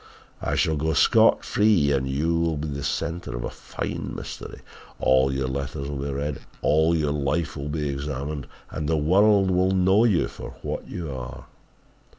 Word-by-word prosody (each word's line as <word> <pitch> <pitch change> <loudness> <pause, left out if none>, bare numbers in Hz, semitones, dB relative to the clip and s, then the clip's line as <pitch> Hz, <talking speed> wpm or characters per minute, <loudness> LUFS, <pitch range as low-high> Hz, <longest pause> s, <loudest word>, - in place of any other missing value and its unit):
I - - -1
shall 80 -1 +1
go 80 +2 0
scot - - +4
free 105 -9 +3
and 65 -1 0
you 75 +5 0
will 85 -2 0
be 75 +1 -3
the 70 0 -4
centre 80 -2 -3
of - - -4
a - - -4
fine - - -5
mystery! - - -8 0.4
All 65 +1 +4
your 65 -1 -1
letters 70 +1 -4
will 70 -1 -4
be - - -2
read, 70 +1 -3 0.2
all 80 +2 +3
your 75 -3 +1
life 75 +3 -1
will 70 +1 -5
be 75 0 -2
examined 70 +1 -4 0.2
and 75 -1 -3
the 80 - +2
world 95 +5 +4
will 90 +1 +3
know 95 +4 +4
you 100 -8 +3
for - - -9
what - - -4
you 80 -6 -5
are!' 65 0 -7
75 Hz, 180 wpm, -25 LUFS, 70-85 Hz, 0.4 s, scot